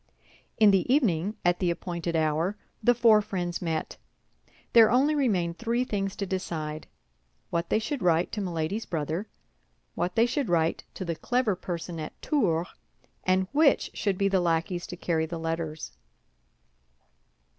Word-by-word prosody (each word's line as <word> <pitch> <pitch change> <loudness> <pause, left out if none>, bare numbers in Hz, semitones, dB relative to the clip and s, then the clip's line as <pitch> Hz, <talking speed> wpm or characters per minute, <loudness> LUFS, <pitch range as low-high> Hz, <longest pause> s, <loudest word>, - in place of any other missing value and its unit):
In 215 -2 +6
the 195 +5 +2
evening, 210 - +2
at 175 0 +3
the 180 - +1
appointed 170 -1 -3
hour, 160 +5 +1 0.2
the 245 +2 +4
four 225 -2 +6
friends 180 -4 -3
met. 160 -3 -3 0.8
There 225 -2 +8
only 270 +6 +3
remained 190 - 0
three 235 +2 0
things 195 -5 -2
to 200 - -3
decide—what 155 - -6
they - - +3
should 250 +4 -3
write 170 0 +2
to 210 - -3
Milady's 180 +3 -2
brother; 165 +4 -2 0.7
what 180 - -2
they 230 - +5
should 255 0 -1
write 165 -1 +1
to 185 - -5
the 170 - -1
clever 245 +2 0
person 175 -2 -5
at 155 - -7
Tours; 180 - 0 0.6
and 185 0 +2
which 295 0 +3
should 200 -3 -1
be 195 - +2
the 195 -2 +2
lackeys 175 +1 -1
to 180 - -7
carry 160 -2 0
the 170 +1 -5
letters. 165 -1 -4
180 Hz, 150 wpm, -27 LUFS, 165-215 Hz, 0.8 s, There